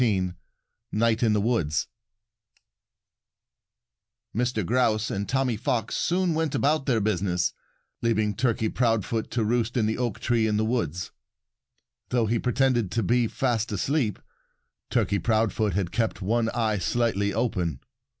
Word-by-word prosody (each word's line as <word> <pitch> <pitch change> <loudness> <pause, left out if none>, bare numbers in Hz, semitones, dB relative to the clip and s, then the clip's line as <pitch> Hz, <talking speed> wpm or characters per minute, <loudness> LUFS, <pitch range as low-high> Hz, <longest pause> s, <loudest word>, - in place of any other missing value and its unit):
XIX 95 -6 +1 0.6
NIGHT 115 +1 +2
IN 115 -3 +3
THE 105 - +2
WOODS 100 -9 0 2.5
Mr. 120 -3 0
Grouse 115 -1 +1
and 100 +1 -3
Tommy 130 -2 +1
Fox 115 -1 -1
soon 180 0 +1
went 160 -2 -1
about 150 0 +1
their 120 -4 +3
business, 95 -4 0 0.5
leaving 110 -3 +1
Turkey 115 0 0
Proudfoot 115 -2 0
to 115 -1 0
roost 120 +2 0
in 115 - +2
the 110 +2 -1
oak 120 -4 -2
tree 115 -2 +1
in 105 -1 +1
the 110 - +1
woods. 90 - -2 1.0
Though 120 -2 +2
he 115 +2 +1
pretended 125 -4 +1
to 115 - +1
be 120 +4 +2
fast 115 -2 -1
asleep, 110 - 0 0.7
Turkey 100 - +1
Proudfoot 110 -3 +1
had 95 -3 -1
kept 115 -2 -1
one 115 +3 +1
eye 110 -4 0
slightly 100 +1 0
open. 95 - -1
115 Hz, 140 wpm, -26 LUFS, 105-120 Hz, 2.5 s, IN